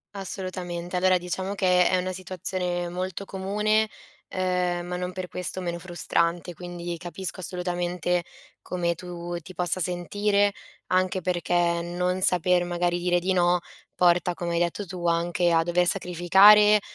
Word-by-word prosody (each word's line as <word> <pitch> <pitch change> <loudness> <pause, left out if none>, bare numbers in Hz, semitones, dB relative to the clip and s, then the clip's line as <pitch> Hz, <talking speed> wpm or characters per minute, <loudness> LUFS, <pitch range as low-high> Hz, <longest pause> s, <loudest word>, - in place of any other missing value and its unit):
Assolutamente. 180 -2 -5
Allora 185 0 +4
diciamo 185 +3 -4
che 180 -2 +4
è 185 - +2
una 185 0 -1
situazione 180 -1 -3
molto 185 +2 -4
comune, 210 +3 0 0.5
uhm, 180 -1 0
ma 180 0 -4
non 180 0 -4
per 185 -1 -5
questo 180 +1 -4
meno 170 -1 -3
frustrante, 175 0 -1
quindi 175 0 -6
capisco 180 +2 -6
assolutamente 180 -1 -1 0.4
come 170 -1 -1
tu 175 -1 -6
ti 185 +3 -12
possa 180 +1 0
sentire. 200 +4 +1 0.4
Anche 185 0 +1
perché 175 0 -1 0.3
non 180 +2 -1
saper 180 -1 +3
magari 175 0 0
dire 175 0 +2
di 185 +2 -1
no 175 -1 +3 0.4
porta, 175 0 +3
come 175 0 -4
hai 170 - +2
detto 175 +4 -1
tu, 175 -1 -4
anche 175 +1 +1
a 165 0 +4
dover 175 +1 +2
sacrificare, 195 +4 +6
180 Hz, 145 wpm, -26 LUFS, 175-185 Hz, 0.5 s, sacrificare